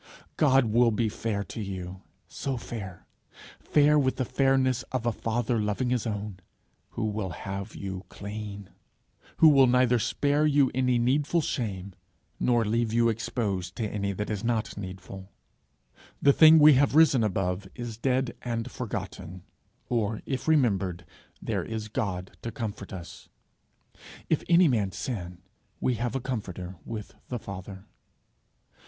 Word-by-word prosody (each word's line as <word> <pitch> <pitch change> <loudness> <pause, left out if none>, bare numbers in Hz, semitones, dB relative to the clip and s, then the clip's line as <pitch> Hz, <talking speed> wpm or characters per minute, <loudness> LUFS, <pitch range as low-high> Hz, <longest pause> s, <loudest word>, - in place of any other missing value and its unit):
God 135 -4 +4
will 115 +2 +4
be 110 0 0
fair 105 -1 -2
to 105 +4 -7
you 95 -2 -6 0.3
so 135 -2 -4
fair! 95 -6 -7 0.5
fair 150 0 +4
with 130 -2 +1
the 130 -1 -1
fairness 130 -1 +2
of 130 -3 -2
a 120 - +2
father 115 +1 -1
loving 105 +4 -1
his 125 -2 0
own 105 -3 -4 0.5
who 110 - -2
will 105 -2 -2
have 100 +4 -6
you 95 -1 -6
clean, 100 -1 -7 0.7
who 160 - +7
will 135 -3 +6
neither 125 -1 +4
spare 145 +6 +1
you 140 -3 +3
any 125 -1 +2
needful 140 +7 +2
shame, 100 -9 -3 0.5
nor 120 -2 +2
leave 115 +1 0
you 115 0 +3
exposed 100 -5 -2
to 110 - -2
any 100 -1 -2
that 105 +3 -4
is 105 0 -3
not 115 -2 -1
needful. 95 0 -8 0.9
The 140 - +5
thing 160 +1 +8
we 150 -1 +8
have 140 +1 +3
risen 150 -7 +6
above, 95 -1 -1
is 120 -2 -5
dead 130 -1 0
and 120 0 -3
forgotten, 95 -6 -6 0.4
or 110 -3 -1
if 135 +1 -3
remembered, 100 - +2 0.4
there - - -1
is 110 -1 -5
God 95 -6 -3
to 115 - -5
comfort 110 -6 -6
us. 90 -3 -9 1.0
'If 160 - +2
any 175 0 +6
man 105 -8 +1
sin, 90 -7 -5 0.4
we 125 - +1
have 120 +2 -2
a - - +1
comforter 95 -8 -5
with 110 -3 -6
the 125 - -3
Father.' 95 -2 -8
115 Hz, 150 wpm, -27 LUFS, 100-130 Hz, 1.0 s, thing